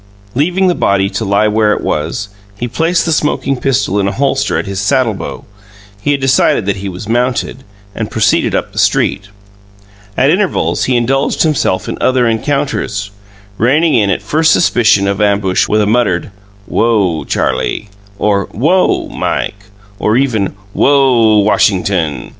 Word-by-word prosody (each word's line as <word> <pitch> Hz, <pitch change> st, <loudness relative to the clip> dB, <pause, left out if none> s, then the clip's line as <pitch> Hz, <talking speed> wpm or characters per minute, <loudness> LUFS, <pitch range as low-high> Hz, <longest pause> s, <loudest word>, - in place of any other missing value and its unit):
Leaving 180 Hz, +8 st, +1 dB
the 180 Hz, -, +3 dB
body 100 Hz, -, +1 dB
to -, -, -3 dB
lie 100 Hz, +1 st, +2 dB
where 105 Hz, 0 st, +2 dB
it -, -, -3 dB
was, 85 Hz, +8 st, -3 dB, 0.3 s
he 120 Hz, -, -2 dB
placed 165 Hz, +7 st, 0 dB
the 165 Hz, -, -1 dB
smoking 150 Hz, -2 st, 0 dB
pistol 125 Hz, -6 st, 0 dB
in 100 Hz, -, 0 dB
a -, -, 0 dB
holster 135 Hz, +1 st, 0 dB
at -, -, -2 dB
his 100 Hz, -1 st, -4 dB
saddlebow 110 Hz, 0 st, -1 dB, 0.6 s
he 145 Hz, -, 0 dB
had 140 Hz, -, -1 dB
decided 130 Hz, -5 st, +2 dB
that 100 Hz, 0 st, -1 dB
he 100 Hz, +1 st, -5 dB
was 95 Hz, +3 st, -8 dB
mounted 125 Hz, +2 st, -1 dB, 0.3 s
and -, -, -4 dB
proceeded -, -, +1 dB
up -, -, -2 dB
the -, -, -5 dB
street. 100 Hz, -, +1 dB, 0.9 s
At 135 Hz, +3 st, +3 dB
intervals 190 Hz, +2 st, 0 dB
he 125 Hz, -1 st, +1 dB
indulged 135 Hz, +3 st, 0 dB
himself 115 Hz, -, 0 dB
in -, -, -5 dB
other 130 Hz, -2 st, +2 dB
encounters, 115 Hz, -4 st, -2 dB, 0.5 s
reining 150 Hz, +7 st, +2 dB
in 105 Hz, -5 st, +2 dB
at 100 Hz, 0 st, -1 dB
first 155 Hz, +8 st, +2 dB
suspicion 110 Hz, -, +3 dB
of 100 Hz, +1 st, -1 dB
ambush 100 Hz, -2 st, +1 dB
with 105 Hz, 0 st, +1 dB
a -, -, +2 dB
muttered, 105 Hz, -5 st, 0 dB, 0.3 s
"Whoa, 100 Hz, -8 st, 0 dB
Charlie!" 105 Hz, -, -2 dB, 0.3 s
or 100 Hz, -1 st, +1 dB
"Whoa, 170 Hz, -, +1 dB
Mike!" 100 Hz, 0 st, -3 dB, 0.3 s
or 110 Hz, +2 st, +1 dB
even 115 Hz, -9 st, 0 dB, 0.2 s
"Whoa, 125 Hz, -6 st, +3 dB
Washington!" 90 Hz, -7 st, 0 dB
115 Hz, 155 wpm, -13 LUFS, 100-135 Hz, 0.9 s, the